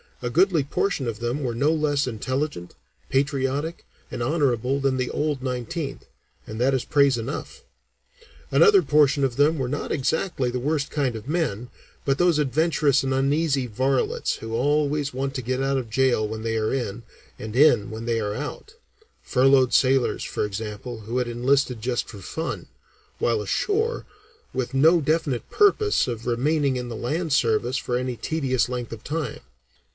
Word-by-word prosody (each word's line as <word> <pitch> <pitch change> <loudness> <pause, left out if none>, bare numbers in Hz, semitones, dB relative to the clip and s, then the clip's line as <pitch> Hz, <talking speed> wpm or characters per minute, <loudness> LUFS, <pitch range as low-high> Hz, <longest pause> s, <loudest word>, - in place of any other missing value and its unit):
"A 120 - -2
goodly 175 -1 +3
portion 145 -1 -1
of 115 -2 -4
them 120 +5 -2
were 120 -3 -2
no 140 +6 +2
less 150 -3 +1
intelligent, 130 - -3 0.3
patriotic, 140 +3 -1 0.2
and - - -5
honorable 135 -2 +1
than 135 -1 +1
the 130 -1 -1
'old' 150 -3 -1
Nineteenth 135 +4 -4 0.4
and 110 +1 -7
that 130 +3 +3
is 130 - -2
praise 140 -3 +3
enough. 140 - -6 0.9
Another 420 -4 +6
portion 145 -1 +3
of 130 -3 0
them 150 +4 +3
were 130 -3 -2
not 145 - -3
exactly 140 -1 0
the 125 - -2
worst 145 +2 -1
kind 135 -5 0
of 110 +3 -8
men, 135 - -1 0.4
but 135 -1 +1
those 175 -3 +4
adventurous 145 0 +2
and 135 0 0
uneasy 140 0 +1
varlets 130 +4 0
who 115 0 -7
always 145 +3 +1
want 135 +1 -2
to 130 - -2
get 130 +2 -2
out 135 0 +1
of 125 -4 -4
jail 120 -2 +2
when 110 +1 -5
they 115 0 -1
are 110 +2 0
in, 120 -4 -3 0.4
and 110 +1 -6
in 125 -7 +5
when 110 +1 -6
they 115 -1 0
are 105 -1 -2
out; 150 - -6 0.5
furloughed 130 -1 +4
sailors, 130 -1 +3
for - - -2
example, 105 +3 -6
who 115 +4 -4
had 125 -1 0
enlisted 125 +1 +1
just 120 +1 -1
for 105 - -10
fun, 95 - -5 0.5
while 115 -3 +1
ashore, 425 - -1 0.5
with 130 -1 -3
no 160 +6 +5
definite 150 -4 0
purpose 415 +1 +3
of 115 -2 -4
remaining 140 +3 +1
in 125 -1 -4
the 115 - -5
land 155 +7 -2
service 120 0 +2
for 125 -1 -1
any 125 0 -2
tedious 130 -2 0
length 125 -2 -4
of 115 -2 -8
time. 150 -5 -3
130 Hz, 170 wpm, -24 LUFS, 120-145 Hz, 0.9 s, Another